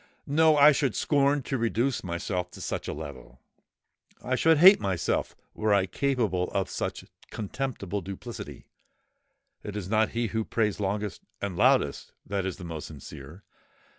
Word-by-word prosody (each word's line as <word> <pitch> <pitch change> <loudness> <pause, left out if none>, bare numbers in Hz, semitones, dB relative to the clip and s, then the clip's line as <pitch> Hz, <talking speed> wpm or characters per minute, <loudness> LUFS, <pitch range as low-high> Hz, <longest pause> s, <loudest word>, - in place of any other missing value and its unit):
No!—I 150 0 +6
should 135 -4 0
scorn 140 -1 +2
to 135 0 -2
reduce 115 +2 0
myself 90 0 -3
to - - -10
such - - -4
a - - -2
level—I 70 - -11
should 160 +5 +4
hate 190 +6 +9
myself 95 -4 -1 0.2
were 110 -1 +2
I 95 -2 +3
capable 105 -4 0
of - - 0
such - - -4 0.2
contemptible 105 -3 -4
duplicity. 100 +6 -8 1.0
It 105 - -7
is 100 -4 -4
not 110 0 +3
he 120 -2 0
who 110 +1 -1
prays 105 -2 -1
longest 105 +1 -2 0.2
and 100 -3 -3
loudest, - - +2
that 100 -1 -2
is 95 - -4
the 90 - -10
most 80 -3 -6
sincere. 75 +4 -11
105 Hz, 145 wpm, -27 LUFS, 90-130 Hz, 1.0 s, hate